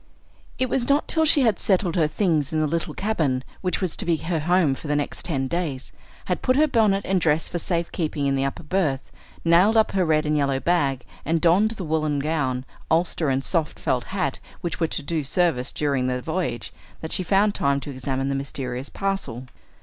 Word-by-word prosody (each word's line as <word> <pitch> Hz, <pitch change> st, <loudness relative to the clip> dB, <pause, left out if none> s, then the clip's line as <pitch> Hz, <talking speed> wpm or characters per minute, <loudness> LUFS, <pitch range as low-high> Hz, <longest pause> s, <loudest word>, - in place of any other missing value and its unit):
It 255 Hz, -, +1 dB
was 245 Hz, 0 st, 0 dB
not 285 Hz, +2 st, +3 dB
till 320 Hz, 0 st, +3 dB
she 300 Hz, -2 st, +6 dB
had 225 Hz, -6 st, +2 dB
settled 185 Hz, -3 st, +1 dB
her 160 Hz, -4 st, +3 dB
things 155 Hz, -4 st, 0 dB
in 160 Hz, -, 0 dB
the 155 Hz, -, +2 dB
little 165 Hz, +2 st, -2 dB
cabin 155 Hz, -11 st, 0 dB, 0.2 s
which 185 Hz, +1 st, -1 dB
was 185 Hz, -4 st, -1 dB
to -, -, 0 dB
be 170 Hz, -, +2 dB
her 165 Hz, +1 st, -2 dB
home 170 Hz, -2 st, +3 dB
for 140 Hz, -, -8 dB
the 145 Hz, -, +1 dB
next 145 Hz, -1 st, -2 dB
ten 135 Hz, -6 st, -1 dB
days, 155 Hz, -5 st, -3 dB, 0.3 s
had 180 Hz, -, -1 dB
put 255 Hz, -, +2 dB
her 300 Hz, +3 st, +5 dB
bonnet 215 Hz, -7 st, +2 dB
and 190 Hz, -1 st, +1 dB
dress 160 Hz, 0 st, +2 dB
for 175 Hz, -, -3 dB
safe 170 Hz, 0 st, -1 dB
keeping 150 Hz, -4 st, -2 dB
in 140 Hz, -, +2 dB
the 135 Hz, 0 st, +1 dB
upper 135 Hz, +4 st, -3 dB
berth, 150 Hz, -5 st, -1 dB, 0.3 s
nailed 180 Hz, +7 st, +5 dB
up 220 Hz, -, +4 dB
her 190 Hz, -1 st, +1 dB
red 155 Hz, -2 st, +2 dB
and 150 Hz, 0 st, +1 dB
yellow 140 Hz, -2 st, +1 dB
bag, 140 Hz, -6 st, +1 dB, 0.2 s
and 165 Hz, +2 st, +1 dB
donned 180 Hz, +6 st, +4 dB
the 190 Hz, -, -4 dB
woollen 155 Hz, -2 st, 0 dB
gown, 140 Hz, -4 st, -1 dB, 0.2 s
ulster, 165 Hz, -2 st, +1 dB
and 135 Hz, 0 st, 0 dB
soft 160 Hz, -2 st, -1 dB
felt 125 Hz, -1 st, -1 dB
hat 190 Hz, -2 st, -2 dB, 0.2 s
which 170 Hz, -, -3 dB
were 165 Hz, -, +2 dB
to 155 Hz, -, -4 dB
do 155 Hz, +1 st, -1 dB
service 140 Hz, -4 st, +1 dB
during 140 Hz, -4 st, 0 dB
the 125 Hz, 0 st, -1 dB
voyage, 160 Hz, -4 st, -3 dB, 0.3 s
that 160 Hz, -, -6 dB
she 190 Hz, -, +1 dB
found 195 Hz, +3 st, +3 dB
time 140 Hz, -4 st, +1 dB
to 140 Hz, -, -7 dB
examine 135 Hz, 0 st, -2 dB
the 140 Hz, -, 0 dB
mysterious 135 Hz, -1 st, -4 dB
parcel. 195 Hz, -, -3 dB
160 Hz, 215 wpm, -24 LUFS, 140-185 Hz, 0.3 s, she